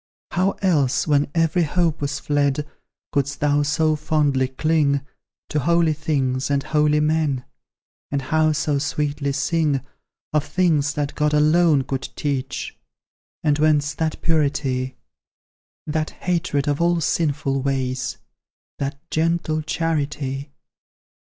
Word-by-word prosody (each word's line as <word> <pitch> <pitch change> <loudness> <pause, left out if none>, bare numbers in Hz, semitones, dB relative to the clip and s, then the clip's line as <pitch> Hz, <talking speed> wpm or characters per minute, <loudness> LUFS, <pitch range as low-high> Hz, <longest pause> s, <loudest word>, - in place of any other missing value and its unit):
How 185 +2 +1
else, 145 -8 +2
when 145 -2 +2
every 165 +1 +2
hope 165 0 +1
was 145 0 -1
fled, 145 0 0 0.5
Couldst 140 0 -1
thou 145 0 +2
so 155 +2 +2
fondly 145 -3 +1
cling 140 +1 +1 0.5
To 150 - 0
holy 170 +2 +3
things 135 -4 -1
and 140 -1 +1
help 150 -1 +2
men? 150 -3 +1 0.6
And 140 -1 -2
how 155 +2 +2
so 150 -1 0
sweetly 145 0 -1
sing, 145 -1 +1 0.5
Of 150 -2 +2
things 155 -6 +1
that 145 -1 -2
God 150 0 +1
alone 155 -1 +4
could 135 +1 -4
teach? 140 -3 -3 0.7
And 150 -1 +2
whence 150 -2 +3
that 160 -1 -2
purity, 140 -5 0 0.9
That 155 0 -1
hatred 165 -5 -1
of 145 +2 0
all 170 0 +3
sinful 150 -3 0
ways 130 -1 -2 0.6
That 140 0 -2
gentle 160 -1 0
charity? 145 -3 -2
150 Hz, 120 wpm, -22 LUFS, 140-155 Hz, 0.9 s, alone